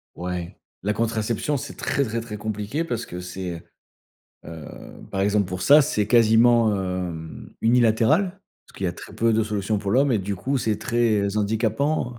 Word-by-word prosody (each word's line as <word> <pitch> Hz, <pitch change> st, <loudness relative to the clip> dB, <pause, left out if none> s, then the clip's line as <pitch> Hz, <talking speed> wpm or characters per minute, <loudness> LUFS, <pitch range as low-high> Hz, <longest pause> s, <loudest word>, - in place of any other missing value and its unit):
Ouais. 90 Hz, -1 st, -5 dB, 0.3 s
La 105 Hz, +2 st, 0 dB
contraception, 115 Hz, +5 st, -1 dB
c'est 140 Hz, +1 st, -7 dB
très, 140 Hz, -, 0 dB
très, 115 Hz, -1 st, -2 dB
très 105 Hz, -2 st, -7 dB
compliqué 105 Hz, +8 st, -3 dB
parce 120 Hz, -8 st, -3 dB
que 90 Hz, -, -7 dB
c'est, 90 Hz, -2 st, -6 dB, 0.8 s
heu, 80 Hz, -2 st, -9 dB, 0.5 s
par 95 Hz, -, -2 dB
exemple 100 Hz, 0 st, +2 dB
pour 90 Hz, 0 st, -4 dB
ça, 145 Hz, +7 st, +7 dB
c'est 105 Hz, -6 st, 0 dB
quasiment, 115 Hz, -1 st, +5 dB
hem, 90 Hz, -4 st, -5 dB
unilatéral. 125 Hz, -, +3 dB, 0.3 s
Parce -, -, -19 dB
qu'il 95 Hz, -, -2 dB
a 85 Hz, -, -1 dB
très 90 Hz, -, -11 dB
peu 115 Hz, +1 st, +2 dB
de 110 Hz, +1 st, +2 dB
solutions 105 Hz, -1 st, -1 dB
pour 100 Hz, -1 st, -3 dB
l'homme 135 Hz, +3 st, +3 dB
et 110 Hz, -, +2 dB
du 100 Hz, +1 st, -3 dB
coup 135 Hz, +9 st, -1 dB
c'est 110 Hz, -4 st, -1 dB
très 110 Hz, -4 st, +1 dB
handicapant, 110 Hz, +6 st, 0 dB
heu, 120 Hz, -, -13 dB
110 Hz, 175 wpm, -23 LUFS, 100-120 Hz, 0.8 s, ça